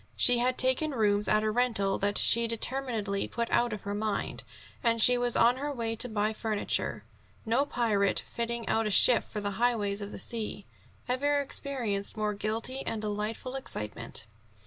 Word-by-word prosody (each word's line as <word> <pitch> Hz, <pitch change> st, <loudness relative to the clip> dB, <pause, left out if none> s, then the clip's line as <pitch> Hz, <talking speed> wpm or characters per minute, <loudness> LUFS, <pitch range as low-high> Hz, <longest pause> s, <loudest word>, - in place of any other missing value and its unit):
She 245 Hz, -1 st, +6 dB
had 250 Hz, +1 st, 0 dB
taken 260 Hz, +3 st, 0 dB
rooms 210 Hz, -2 st, +1 dB
at 215 Hz, 0 st, +2 dB
a 215 Hz, -, 0 dB
rental 220 Hz, -5 st, +1 dB
that 200 Hz, +1 st, +1 dB
she 235 Hz, 0 st, +6 dB
determinedly 230 Hz, -4 st, 0 dB
put 235 Hz, 0 st, -3 dB
out 240 Hz, 0 st, +2 dB
of 210 Hz, -2 st, -6 dB
her 200 Hz, -, -4 dB
mind, 210 Hz, 0 st, -2 dB, 0.4 s
and 230 Hz, -1 st, +2 dB
she 250 Hz, +3 st, +7 dB
was 245 Hz, -1 st, 0 dB
on 240 Hz, +2 st, +4 dB
her 290 Hz, +2 st, -3 dB
way 230 Hz, -4 st, -3 dB
to 245 Hz, -, -1 dB
buy 215 Hz, 0 st, 0 dB
furniture. 215 Hz, -1 st, -2 dB, 0.4 s
No 245 Hz, +6 st, +1 dB
pirate, 210 Hz, -7 st, +1 dB
fitting 235 Hz, 0 st, -3 dB
out 225 Hz, -1 st, +1 dB
a -, -, 0 dB
ship 235 Hz, +4 st, +5 dB
for 210 Hz, -, -7 dB
the 200 Hz, -1 st, -3 dB
highways 210 Hz, -4 st, +1 dB
of 205 Hz, 0 st, -6 dB
the -, -, -8 dB
sea, 215 Hz, -3 st, -4 dB, 0.4 s
ever 285 Hz, +3 st, +1 dB
experienced 240 Hz, -8 st, -3 dB
more 210 Hz, -1 st, -1 dB
guilty 220 Hz, +5 st, -2 dB
and 225 Hz, -, -3 dB
delightful 215 Hz, +4 st, -4 dB
excitement. 115 Hz, -, -5 dB
225 Hz, 175 wpm, -29 LUFS, 210-245 Hz, 0.4 s, she